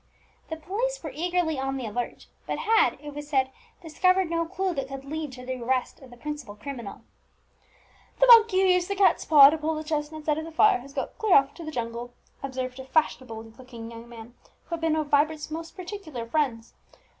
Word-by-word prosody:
The 320 - -3
police 440 +10 -3
were 310 - -5
eagerly 335 -1 0
on 270 0 -2
the 255 - -4
alert, 235 +3 -4 0.2
but - - -2
had, 450 +1 +3
it 295 -1 -7
was 295 0 -7
said, 265 -2 +1 0.3
discovered 365 +2 +2
no 335 0 0
clue 380 +1 -2
that 275 -4 -3
could 270 0 -8
lead 305 0 -4
to 250 0 -10
the 255 -1 -4
arrest 255 +1 -1
of 265 - -14
the 245 - -14
principal 280 -5 -6
criminal. 235 -2 -7 1.2
"The - - +6
monkey 450 -5 +7
who - - +4
used 360 -1 +3
the 400 - -2
cat's 395 0 +3
paw 285 -3 +9
to 320 - -2
pull 315 +1 -1
the 310 - -4
chestnuts 305 0 -4
out 300 0 +2
of 315 - -5
the 330 - -8
fire, 370 0 +4
has 275 +3 -13
got - - -4
clear 430 -4 +4
off 275 0 +4
to 340 - -10
the 310 - -5
jungle," 240 -2 -5 0.3
observed 260 -1 -4
a 265 - -7
fashionable 260 -6 0 0.2
looking 235 -3 -9
young 230 +1 -11
man, 235 0 -11 0.3
who - - -32
had 335 -1 -3
been 325 -1 +2
one 315 - +1
of 295 - -7
Vibert's 305 +1 +2
most 330 +1 -6
particular 360 - -7
friends. 235 -4 -1
300 Hz, 215 wpm, -26 LUFS, 255-330 Hz, 1.2 s, paw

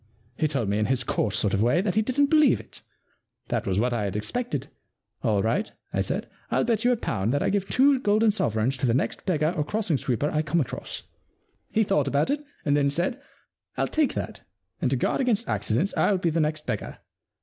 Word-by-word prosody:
He 155 - +1
told 135 -8 -1
me 100 +1 0
in 105 - +1
his 130 -1 0
coarse 105 -3 0
sort 105 - +1
of 100 - +2
way 125 +9 +3
that 190 0 0
he 215 - +3
didn*t 260 +6 +2
believe 305 -2 +4
it. - - -12 0.7
That - - -1
was 95 0 +1
what 125 +2 +1
I 110 -3 -1
had 100 - -3
expected. 235 - -2 0.6
All - - +1
right,'* - - 0 0.2
I - - +1
said, - - -2 0.2
ril - - +2
bet 225 -2 +1
you 245 - +4
a 245 - +2
pound 100 - -1
that 145 - +1
I - - +1
give 200 -1 0
two 275 +1 +4
golden 215 -1 +3
sovereigns 115 - 0
to 125 - 0
the 115 - +2
next 135 - -2
beggar 155 -3 +2
or 150 - 0
crossing 195 -4 -1
sweeper 135 +4 -1
I 155 - +1
come 155 +2 0
across.*' 140 - -4 0.7
He 220 - +2
thought 150 -8 +1
about 140 - +1
it 295 +1 -1 0.2
and 145 - +3
then 140 -1 +3
said: 175 - -1 0.6
Fll - - 0
take 310 -3 +1
that, - - -5 0.4
and - - +2
to - - +1
guard - - 0
against 245 -5 +1
accidents 110 - 0
Fll 195 -3 +2
be 170 -2 +1
the 165 - 0
next 155 0 -1
beggar. 110 -5 -4
155 Hz, 225 wpm, -26 LUFS, -, 0.7 s, believe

